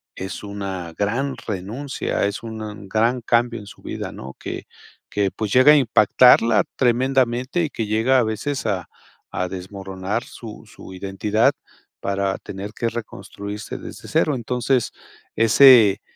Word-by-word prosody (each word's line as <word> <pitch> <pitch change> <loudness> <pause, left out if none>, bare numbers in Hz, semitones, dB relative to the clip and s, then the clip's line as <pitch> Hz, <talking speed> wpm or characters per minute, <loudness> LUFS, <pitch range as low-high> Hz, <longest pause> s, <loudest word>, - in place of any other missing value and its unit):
es 95 +1 -6
una 95 -4 -5
gran 125 +7 -1
renuncia, 110 +9 -3
es 100 +3 -5
un 110 -3 -7
gran 115 +5 +1
cambio 120 0 +1
en 105 - -11
su - - -14
vida, - - -5
¿no? 65 +1 -9
Que - - -6 0.4
que 100 -2 0
pues 110 -2 -4
llega 130 +6 +7
a - - +7
impactarla 115 -3 +5
tremendamente 130 +4 +1
y 155 - -1
que 115 -5 -4
llega 115 +5 +3
a - - +3
veces 110 +5 -3
a 95 -5 -2 0.5
a 90 - -1
desmoronar 95 +3 -5
su 110 -3 -10
su 95 - -12
identidad 105 +7 +1 0.5
para 100 0 -1
tener 100 +2 -7
que 115 - -1
reconstruirse 105 -2 -7
desde - - -10
cero. 150 - +1
Entonces, 125 +1 0 0.5
ese 115 -3 +7
110 Hz, 140 wpm, -22 LUFS, 100-125 Hz, 0.5 s, llega